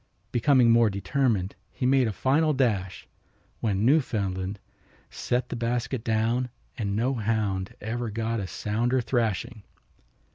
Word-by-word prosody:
Becoming 125 -1 +4
more 115 -1 +5
determined 100 -1 0 0.2
he 125 - -3
made 130 -1 +4
a - - -1
final 150 - +2
dash, 105 -9 -1 0.5
when 105 -1 0
Newfoundland 100 -9 +1 0.5
set 125 +1 -2
the - - -3
basket 120 0 -2
down 115 +3 0 0.3
and 100 -6 -2
no 120 +5 +1
hound 105 -5 -1
ever 115 +2 -3
got 115 +1 -2
a 95 - -3
sounder 120 +7 0
thrashing. 120 -1 -1
115 Hz, 130 wpm, -26 LUFS, 105-125 Hz, 0.5 s, more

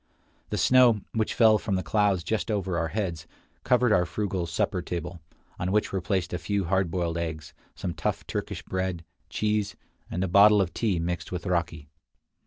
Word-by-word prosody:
The - - -2
snow, 125 -4 +5
which 110 -1 -1
fell 110 -2 +5
from 100 -2 -2
the 95 - -1
clouds 100 -1 +1
just 110 +7 -2
over 95 -4 -1
our 85 0 0
heads, 90 -4 -3 0.4
covered 125 -2 +3
our 90 -4 +3
frugal 95 -4 -2
supper - - -1
table, 85 0 -5 0.4
on 90 +1 -1
which 105 0 +1
were 95 - 0
placed 95 -1 -1
a 90 - -2
few 100 +5 -1
hard 95 0 +1
boiled 85 -1 -1
eggs, 80 -3 -5 0.2
some 90 -2 -4
tough - - -3
Turkish - - -4
bread, 95 -2 -3 0.2
cheese, 105 +3 -1 0.3
and 90 - -2
a - - 0
bottle 100 +3 +6
of 95 -3 0
tea 105 -6 0
mixed 85 0 -3
with 90 0 -4
raki. 85 -4 -2
95 Hz, 185 wpm, -27 LUFS, 85-105 Hz, 0.4 s, bottle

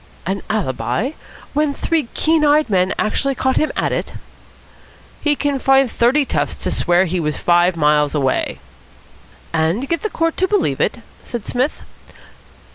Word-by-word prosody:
"An 195 +2 -2
alibi? 215 - -1 0.4
When 295 -1 +1
three 325 -6 -1
keen 320 -1 +2
eyed 295 -4 +3
men 185 -1 +2
actually 275 +6 0
caught 260 0 0
him 310 - +1
at - - 0
it?" - - -3 1.1
"He 295 -1 +2
can 285 -1 -1
find 270 -2 +3
thirty 265 +5 +2
toughs - - -1
to - - -2
swear 175 +1 +2
he 180 0 -2
was 150 -2 -2
five 175 0 +3
miles 150 -1 +2
away." 135 -3 0 1.0
"And 165 +11 0
get 335 +2 -1
the 435 - -2
court 330 -3 -1
to 375 - +2
believe 415 +1 0
it?" - - 0 0.3
said 235 -4 -6
Psmith. 255 +4 -2
245 Hz, 155 wpm, -19 LUFS, 175-295 Hz, 1.1 s, eyed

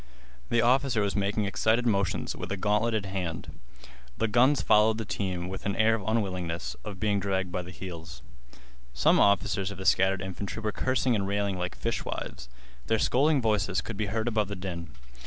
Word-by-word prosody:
The 120 -1 +3
officer 125 -2 +3
was 100 - -1
making 100 +1 0
excited 110 +4 +1
motions 100 -5 0
with - - -6
a 100 - -1
gauntleted 105 +1 +1
hand. 95 -4 -5 0.6
The 115 - +1
guns 125 +6 +4
followed 110 +1 +4
the 110 - -4
teams 90 -3 -3
with 95 +1 -6
an 100 - -1
air 110 +1 +4
of 110 - -1
unwillingness, 90 -7 -2
of 100 -3 -7
being 105 0 +1
dragged 95 -2 -1
by 90 - -2
the 90 - -10
heels. 85 -2 -8 0.7
Some 60 - +4
officers 100 -1 +2
of 100 - -8
the 95 - -7
scattered 95 0 +3
infantry 95 +3 -5
were 110 -1 -1
cursing 130 +2 +1
and 100 -3 0
railing 100 -1 0
like 90 0 -3
fishwives. 60 +1 -4 0.4
Their 110 - +2
scolding 140 +4 +2
voices 100 -4 +1
could 110 - -6
be 105 0 -2
heard 110 +3 -2
above 110 -3 +1
the 100 - -5
din. 90 -3 -6
100 Hz, 185 wpm, -28 LUFS, 95-110 Hz, 0.7 s, guns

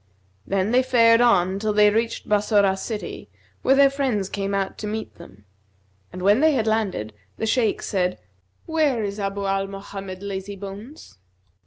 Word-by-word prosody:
Then 195 +2 0
they 250 +1 +4
fared 230 -2 +4
on 195 -5 +3
till 215 0 -1
they 210 0 +5
reached 225 +2 -2
Bassorah 205 -2 +3
city 210 +2 -6 0.3
where 270 - +4
their 280 0 +6
friends 255 -9 -1
came 200 0 -2
out 195 -1 -2
to 210 - -4
meet 220 +1 -5
them; 105 -11 -15 0.7
and 180 +1 -7
when 205 +4 +4
they 315 +1 +4
had 230 -5 0
landed, 205 - -1 0.2
the - - -2
Shaykh 225 -1 +1
said, 180 -2 -1 0.5
'Where 300 -8 +1
is 200 0 -4
Abu 200 0 -3
Mohammed 195 -1 -4
Lazybones?' 200 - -8
205 Hz, 155 wpm, -23 LUFS, 195-230 Hz, 0.7 s, their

